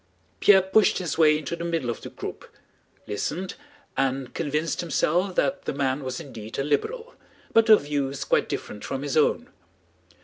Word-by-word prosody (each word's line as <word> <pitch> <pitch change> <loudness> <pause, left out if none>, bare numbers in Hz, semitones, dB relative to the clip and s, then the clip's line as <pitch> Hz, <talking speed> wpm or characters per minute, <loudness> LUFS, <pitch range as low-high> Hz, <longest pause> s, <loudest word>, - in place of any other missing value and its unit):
Pierre 195 -2 +6
pushed 190 +2 +3
his 180 -4 -2
way 155 -1 +6
into 155 +2 -4
the 170 - -6
middle 165 -8 -1
of - - -7
the - - -7
group, - - -8 0.6
listened, 170 - -3 0.4
and 135 -1 -1
convinced 155 0 -1
himself 175 +3 0
that 140 - 0
the - - -2
man 135 0 0
was 130 -1 -4
indeed 110 -5 -8
a 140 - 0
liberal, 455 - -2 0.4
but 225 0 +5
of 215 - +8
views 140 -2 -2
quite - - +1
different 105 - -5
from 135 0 -4
his 145 -2 -2
own. 155 - +2
150 Hz, 170 wpm, -25 LUFS, 135-175 Hz, 0.6 s, of